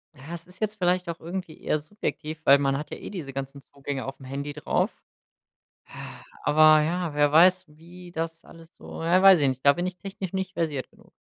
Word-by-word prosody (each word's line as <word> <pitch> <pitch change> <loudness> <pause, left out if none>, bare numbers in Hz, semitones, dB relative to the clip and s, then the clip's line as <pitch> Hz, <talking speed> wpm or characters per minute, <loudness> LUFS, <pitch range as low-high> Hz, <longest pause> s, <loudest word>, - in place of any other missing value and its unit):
Ja 145 +4 -10
es 170 -1 -7
ist 180 +1 -18
jetzt 215 -1 -1
vielleicht 180 -1 +1
auch 170 - -5
irgendwie 175 -1 -6
eher 155 - 0
subjektiv, 155 -1 -5
weil 140 +1 +8
man 135 -1 +1
hat 150 - -7
ja - - -5
eh - - -8
diese 165 -9 -6
ganzen 135 +1 -6
Zugänge 140 -2 -6
aufm 135 0 -8
Handy 140 +2 -5
drauf. 150 - 0 1.0
Ah, - - -10 0.2
aber 155 0 +6
ja, 170 0 -1
wer 145 0 +3
weiß, 185 +4 +5
wie 170 +4 -14
das 165 0 -5
alles 165 0 -16
so - - -9
ja, 175 +3 +3
weiß 195 -3 +8
ich 135 - +3
nicht, 130 +1 -5
da 140 - +8
bin 175 +3 -3
ich 185 0 -4
technisch 195 -2 -7
nicht 190 0 -3
versiert 150 -5 -2
genug. - - -23
160 Hz, 215 wpm, -26 LUFS, 145-180 Hz, 1.0 s, weil